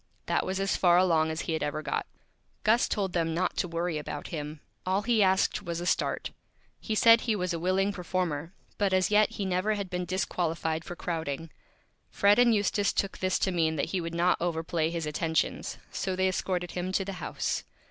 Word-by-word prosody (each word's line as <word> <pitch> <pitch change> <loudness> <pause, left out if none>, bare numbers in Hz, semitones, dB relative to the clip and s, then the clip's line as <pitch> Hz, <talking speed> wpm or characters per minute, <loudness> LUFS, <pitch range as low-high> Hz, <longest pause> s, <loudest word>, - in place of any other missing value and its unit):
That - - 0
was 190 +1 -1
as 195 0 +1
Far 175 -1 +5
Along 165 -4 +3
as 160 +1 -2
he 165 - -2
had 160 - -1
ever 150 +1 -2
got. - - -2 0.6
Gus 225 +3 +4
told 195 -4 -1
them 165 -2 0
not 185 +2 0
to - - 0
Worry 170 -1 -2
about 145 -1 -6
him. 150 -2 -5 0.2
All 190 +2 0
he 230 -1 +3
asked 190 0 +3
was 170 0 -4
a 175 - -4
Start. - - 0 0.5
He 220 - -3
said 230 +1 +7
he 225 -3 0
was 180 -3 -1
a 165 - -2
Willing 190 +3 +1
Performer, 175 -4 -2 0.3
but 200 -2 +2
as 185 +2 +2
yet 210 0 +4
he 200 - -3
never 190 +3 +1
had 200 -3 -5
been 180 0 -2
Disqualified 165 -3 -1
for 175 - -7
Crowding. 165 -3 -4 0.6
Fred 205 +3 +4
and 245 -1 +6
Eustace 205 0 +1
took 195 - -1
this 185 0 +1
to 190 - 0
mean 160 -3 +1
that - - -1
he 185 - 0
would 165 0 -5
not 175 +1 +2
Overplay 165 -1 0
his 165 -1 -3
Attentions, 160 +1 -1
so 190 -1 -2
they 190 0 +2
escorted 180 -1 -2
him 180 +1 -3
to 195 - +1
the 195 - -4
House. - - -2
180 Hz, 210 wpm, -29 LUFS, 165-195 Hz, 0.6 s, said